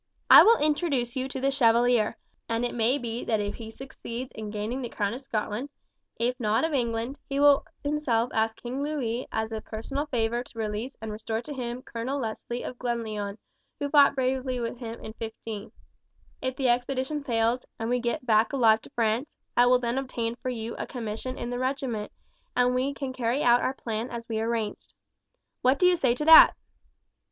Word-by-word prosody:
I - - +12
will 460 +1 +6
introduce 290 -5 0
you 260 0 -1
to 270 0 -5
the 270 +1 +1
Chevalier, 240 -3 +3 0.3
and 230 +1 0
it 245 - -3
may 240 +3 +2
be 235 -3 -4
that 220 -2 +1
if 205 0 -2
he 225 -2 -8
succeeds 255 0 -7
in 215 -1 -6
gaining 215 +5 -3
the 240 - -4
crown 205 -2 -1
of 250 - -6
Scotland, 230 0 -3 0.5
if 245 +2 -1
not 220 +2 +1
of 320 - -2
England, 235 +1 -1
he 275 0 -1
will 285 -1 +6 0.2
himself 280 -6 0
ask 220 0 0
King 250 +3 -4
Louis 260 -5 -2
as 220 0 -2
a 220 -1 -4
personal 275 +8 -4
favour 235 -2 0
to 245 - -17
release 220 +4 -3
and 220 - -4
restore 220 +2 -3
to 295 - -6
him 250 -1 -5
Colonel 250 +3 -4
Leslie 240 0 -4
of 250 - -7
Glenlyon, 220 -4 -3 0.4
who 285 -1 -3
fought 285 -2 +6
bravely 260 -1 -1
with 235 0 -4
him 230 -2 -6
in 220 - -8
'15. 220 -2 -6 0.7
If 260 0 -2
the 265 -1 0
expedition 260 +4 0
fails, 235 -1 +1
and 225 - -3
we 245 +1 +1
get 240 +1 -2
back 220 0 +3
alive 225 -5 +4
to - - -14
France, 230 +4 0 0.2
I 245 0 +5
will 250 0 +6
then 245 +1 -1
obtain 235 -3 -3
for 250 +1 -5
you 230 -2 -4
a - - -4
commission 240 +2 -5
in 240 - -4
the 245 - -3
regiment, 255 -5 -2 0.5
and 250 0 +4
we 265 +3 0
can 270 -2 -4
carry 250 +2 0
out 240 0 +5
our 265 - -1
plan 225 0 -4
as 235 -1 -6
we 220 -1 -2
arranged. 225 -2 -3 0.7
What 260 +2 +4
do 360 - +3
you 360 0 +6
say 255 -7 +2
to 300 - -3
that?" 320 0 +10
240 Hz, 200 wpm, -27 LUFS, 225-265 Hz, 0.7 s, I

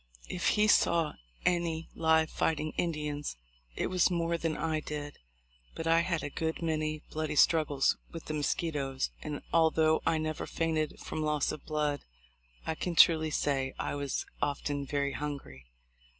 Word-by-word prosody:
If 180 - -1
he 210 0 +5
saw 170 -6 +4 0.3
any 170 -2 +1
live 160 -1 +3
fighting 155 -1 0
Indians, 150 - -2 0.4
it - - -1
was 185 -1 +3
more 170 -1 0
than 165 -2 -1
I 160 -1 0
did, 145 -1 -6 0.6
but 165 - -4
I 165 0 +5
had 170 -1 0
a 145 - -4
good 160 +2 -2
many 155 -1 -1
bloody 155 -1 -2
struggles 150 -3 +4
with 165 - -8
the 155 - -4
mosquitos; 145 -3 -1
and, 150 -2 -5
although 160 -1 +4
I 165 - +2
never 155 0 -3
fainted 160 -2 -1
from 155 - -4
loss 150 -2 +1
of 150 - -8
blood, 150 -2 0 0.6
I 160 - 0
can 170 +2 -3
truly 160 -2 +6
say 135 -3 0
I - - -2
was 140 -1 -2 0.2
often 145 -1 -1
very 140 0 0
hungry. 140 - -6
155 Hz, 155 wpm, -31 LUFS, 145-165 Hz, 0.6 s, truly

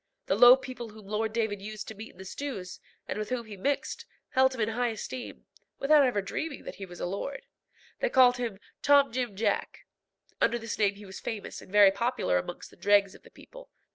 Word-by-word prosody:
The - - +1
low 245 +1 +9
people 255 -3 -7
whom 215 -1 -14
Lord 215 +2 -1
David 220 -3 -1
used 215 0 -7
to - - -6
meet 220 +2 -10
in - - -24
the 190 - -10
stews, 195 -5 -6 0.3
and - - -3
with 215 - -4
whom 250 -2 -2
he 215 -2 -9
mixed, 275 +9 -2 0.2
held 260 0 +3
him 235 - -3
in 215 - +1
high 245 +2 0
esteem, 240 +2 -6 0.3
without 295 +1 +5
ever 240 -7 +1
dreaming 285 +9 -4
that - - -8
he 195 - -7
was 175 -1 -11
a - - -2
lord. 200 +9 -4 0.5
They - - +1
called 250 - +6
him 235 -5 -3 0.2
Tom 285 -2 +5
Jim 245 -4 -2
Jack. 205 0 -1 0.6
Under 240 - +3
this 230 -2 -5
name 205 -1 +3
he 205 +1 -12
was 190 -1 -9
famous 215 -3 -6
and - - -15
very 205 -1 +7
popular 235 - 0
amongst 175 - -7
the - - -18
dregs 200 -1 +3
of - - -15
the - - -17
people. - - -14
220 Hz, 220 wpm, -29 LUFS, 200-255 Hz, 0.6 s, low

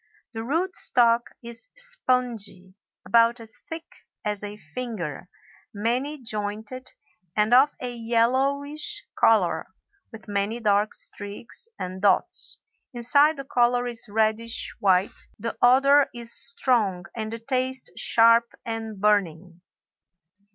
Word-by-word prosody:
The 225 0 -4
root 335 +9 -1
stock 235 -1 +3
is 235 - -7
spongy, 245 - -2 0.3
about 230 +5 +4
as 225 -1 -12 0.2
thick 325 0 -6 0.4
as 210 -1 -2
a 205 0 -6
finger, 180 - -6 0.5
many 250 +8 -1
jointed, 220 +2 -5 0.5
and 215 +2 +2
of 265 +4 +7
a 250 -1 -4
yellowish 260 +6 0
color, 180 -7 +3 0.4
with 225 0 -12
many 205 +3 -1
dark 210 -1 +2
streaks 205 - -5
and 185 +1 -6
dots. 200 - +1 0.4
Inside 285 +6 +4
the 275 - -6
color 245 -1 +2
is 235 -2 -4
reddish 220 +2 0
white. 190 0 +1
The 230 +2 -4
odor 275 +3 +5
is 235 -1 -5
strong 220 -10 +1
and 220 -1 -4
the 230 - -4
taste 255 +2 -1
sharp 230 0 +4
and 225 -2 -5
burning. 180 -4 0
230 Hz, 115 wpm, -25 LUFS, 205-255 Hz, 0.5 s, of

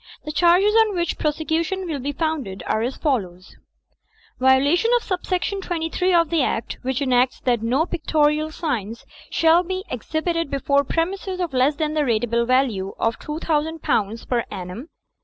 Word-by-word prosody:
The 305 - -3
charges 355 +6 +4
on 445 -3 +4
which 345 -1 -1
prosecution 320 +4 -1
will 310 -5 -3
be 280 +3 -3
founded 285 - -3
are 220 - 0
as 245 +3 -2
follows: 190 - -2 0.9
(i) 255 - -2
Violation 285 +11 +4
of 485 - +1
sub 370 -3 -3
section 385 +2 -1
23/ 350 +1 +1
of 335 -1 0
the 330 -3 +2
Act, 230 - -2
which 260 +2 -1
enacts 255 -1 +2
that 240 -3 +1
no 255 +8 +1
pictorial 310 -3 +1
signs 235 - -4 0.2
shall 330 +1 +4
be 370 +1 -4
exhibited 315 +6 -2
before 280 +1 +1
premises 370 +5 -2
of 350 -5 -2
less 260 +3 +3
than 305 0 -1
the 310 - +1
ratable 235 -2 +1
value 240 -7 +1
of 225 0 -1
£2000 300 -8 -1
per 240 -2 0
aimum. 195 - -7
300 Hz, 160 wpm, -22 LUFS, 250-335 Hz, 0.9 s, charges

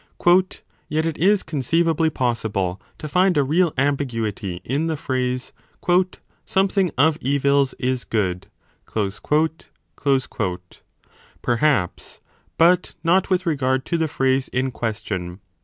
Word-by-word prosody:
Yet 155 +1 0
it 165 -2 -3
is 200 +4 +3
con 155 -3 -4
ceivably 165 +3 +2
possible 110 -8 -1 0.2
to 155 - -6
find 180 +2 +3
a 145 - +4
real 165 +5 +2
ambiguity 115 -10 -1
in 145 +6 -1
the 160 -1 -1
phrase 130 -2 -2 0.9
"Something 195 -1 +1
of 155 +3 +3
evils 140 0 +2
is 130 0 -1
good". 95 -5 -2 0.4
Perhaps, 150 +10 -1 2.9
but 175 +2 +3
not 180 +4 +3
with 185 -1 +2
15 170 - +1
regard 130 -2 0
to 170 - 0
the 160 - +1
phrase 135 -2 +1
in 130 +1 -1
question. 105 -6 -4
140 Hz, 115 wpm, -22 LUFS, 120-165 Hz, 2.9 s, a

